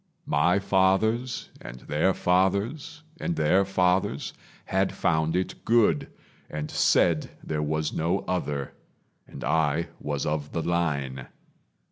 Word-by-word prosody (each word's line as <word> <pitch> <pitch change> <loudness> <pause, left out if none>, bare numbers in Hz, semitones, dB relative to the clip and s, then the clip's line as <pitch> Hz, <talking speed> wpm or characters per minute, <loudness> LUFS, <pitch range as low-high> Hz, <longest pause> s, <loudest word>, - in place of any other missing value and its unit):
My 75 +6 +3
fathers 100 +6 +1
and 60 +1 -9
their 75 +6 +1
fathers 100 - 0 0.2
and 170 - -2
their 95 - +3
fathers 95 -1 0 0.3
Had - - +1
found 80 +1 +1
it 90 +1 -2
good, 110 -10 +3 0.4
and 75 0 -5
said 80 -3 +3
there 75 -1 -2
was 75 0 -1
no 85 +4 0
other, 75 -7 -2 0.5
And - - -9
I 80 +1 +1
was 75 -1 -3
of 75 -1 -2
the 85 - -1
line. 70 -7 -1
85 Hz, 120 wpm, -26 LUFS, 75-95 Hz, 0.5 s, My